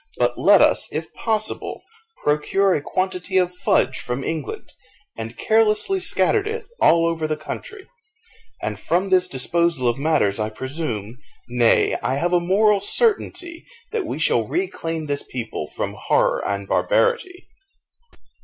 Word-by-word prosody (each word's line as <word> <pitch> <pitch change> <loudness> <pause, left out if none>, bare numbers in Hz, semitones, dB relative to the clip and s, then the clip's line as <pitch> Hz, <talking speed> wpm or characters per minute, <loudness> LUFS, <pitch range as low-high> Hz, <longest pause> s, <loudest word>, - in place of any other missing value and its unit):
But - - +1
let - - +5
us, - - +2
if - - -5
possible, 215 -1 -1 0.4
procure 180 +6 +2
a 150 - 0
quantity 185 +3 -2
of 180 -1 +2
fudge 180 - +1
from 125 +2 -4
England, 160 -2 -5 0.4
and 115 +1 -7
carelessly 220 - +2
scatter 430 - +3
it 440 +3 -5 0.2
over 165 -1 +3
all - - +1
the 155 0 -2
country; 385 - -8 0.8
and - - -3
from 185 +3 0
this 180 -1 +4
disposal 165 -1 +1
of 120 +2 0
matters 140 -10 +1
I 110 0 -1
presume 125 -3 -5 0.3
nay, 120 -1 +3
I 130 - 0
have 175 +5 -1
a 175 - +5
moral 200 +3 +2
certainty, 350 - +1 0.3
that 445 -4 -2
we - - -4
shall - - +1
reclaim 165 - -3
this 145 -1 -1
people 115 -11 -6
from - - -5
horror - - +1
and 100 0 -3
barbarity." 485 -7 0
170 Hz, 145 wpm, -21 LUFS, 135-215 Hz, 0.8 s, let